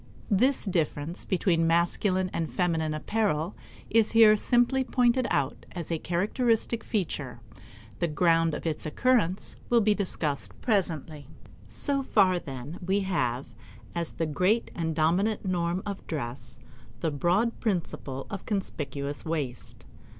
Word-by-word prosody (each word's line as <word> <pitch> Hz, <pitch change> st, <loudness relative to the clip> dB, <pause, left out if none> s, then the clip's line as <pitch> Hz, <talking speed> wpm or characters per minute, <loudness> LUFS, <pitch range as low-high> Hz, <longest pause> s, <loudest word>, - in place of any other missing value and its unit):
This 255 Hz, +7 st, +3 dB
difference 165 Hz, -2 st, -1 dB
between 170 Hz, -3 st, +2 dB
masculine 185 Hz, +3 st, +2 dB
and 165 Hz, -1 st, -2 dB
feminine 160 Hz, -4 st, 0 dB
apparel 180 Hz, -1 st, -1 dB, 0.3 s
is 225 Hz, 0 st, +3 dB
here 225 Hz, -2 st, +8 dB
simply 245 Hz, +4 st, +2 dB
pointed 250 Hz, -1 st, +2 dB
out 140 Hz, -1 st, -1 dB
as 170 Hz, -2 st, -4 dB
a 165 Hz, -, 0 dB
characteristic 225 Hz, +7 st, 0 dB
feature. 150 Hz, -, -3 dB, 0.6 s
The 170 Hz, -, +1 dB
ground 165 Hz, 0 st, +2 dB
of -, -, -7 dB
its 155 Hz, -1 st, -1 dB
occurrence 200 Hz, 0 st, +1 dB
will 240 Hz, -, +5 dB
be 210 Hz, 0 st, +4 dB
discussed 165 Hz, -8 st, -2 dB
presently. 160 Hz, -, -1 dB, 0.4 s
So 280 Hz, -1 st, 0 dB
far, 195 Hz, -8 st, +3 dB
then, 135 Hz, +2 st, -7 dB
we 195 Hz, +3 st, +1 dB
have, 130 Hz, -10 st, -1 dB, 0.4 s
as 170 Hz, -1 st, -2 dB
the 165 Hz, -, -1 dB
great 185 Hz, +9 st, +1 dB
and 160 Hz, -2 st, -2 dB
dominant 180 Hz, +8 st, +1 dB
norm 175 Hz, 0 st, 0 dB
of 200 Hz, -1 st, -6 dB
dress, 120 Hz, -4 st, -5 dB, 0.4 s
the 160 Hz, -, 0 dB
broad 180 Hz, -, +1 dB
principle 165 Hz, -, -2 dB
of 200 Hz, -2 st, -6 dB
conspicuous 145 Hz, -8 st, -3 dB
waste. 145 Hz, -7 st, -4 dB
175 Hz, 130 wpm, -28 LUFS, 155-210 Hz, 0.6 s, here